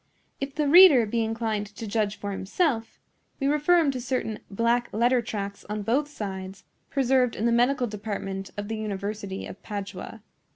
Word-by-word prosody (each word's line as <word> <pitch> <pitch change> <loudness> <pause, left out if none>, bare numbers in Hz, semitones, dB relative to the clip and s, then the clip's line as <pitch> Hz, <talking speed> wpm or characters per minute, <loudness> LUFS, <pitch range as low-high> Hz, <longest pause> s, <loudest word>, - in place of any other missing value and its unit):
If 275 0 -4
the 300 -1 +1
reader 310 -6 +8
be 230 +2 0
inclined 220 -2 -2
to 210 +3 -8
judge 210 -1 0
for 205 - -4
himself, 225 - -1 0.4
we 275 - -1
refer 300 +5 +4
him 315 -5 +3
to 255 -2 -5
certain 235 -4 -2
black 235 +4 +1
letter 240 +3 +3
tracts 200 -3 -5
on 210 0 -4
both 265 +8 +1
sides, 195 -8 -6 0.3
preserved 260 -2 +2
in 220 - -2
the 235 - +3
medical 245 +2 +3
department 200 -3 -5
of 205 0 -4
the 220 0 -3
University 205 -1 -4
of - - -10
Padua. 200 +1 -7
225 Hz, 170 wpm, -26 LUFS, 205-255 Hz, 0.4 s, reader